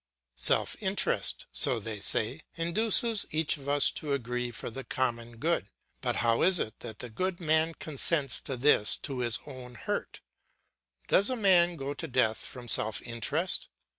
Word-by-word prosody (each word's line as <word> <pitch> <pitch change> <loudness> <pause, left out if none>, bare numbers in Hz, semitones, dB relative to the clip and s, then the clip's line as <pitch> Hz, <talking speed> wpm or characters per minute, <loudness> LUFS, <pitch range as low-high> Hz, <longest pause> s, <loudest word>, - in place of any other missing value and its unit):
Self - - +4
interest, - - -1
so 120 - +3
they 110 0 -7
say, 115 +8 +2
induces 215 +5 +4
each 155 0 -1
of 140 0 -8
us 145 0 +4
to 150 -2 -4
agree 125 -2 -3
for 120 0 -7
the 135 +4 -8
common 120 -3 -3
good. 155 - -2 0.3
But - - -2
how 115 0 +1
is 185 +1 +6
it 110 - -5
that 110 -3 -8
the 125 - -9
good 185 +8 -3
man 160 0 0
consents 145 -2 0
to 135 - -5
this 120 -5 +2
to 135 -3 -4
his 120 -2 +1
own 130 -3 -10
hurt? - - -5 0.9
Does 200 +5 +3
a 255 - -2
man 180 -6 +3
go 140 -2 -5
to 165 +3 -7
death 120 -5 0
from 125 -2 -8
self 110 -1 +1
interest? 145 - -2
135 Hz, 165 wpm, -28 LUFS, 120-165 Hz, 0.9 s, is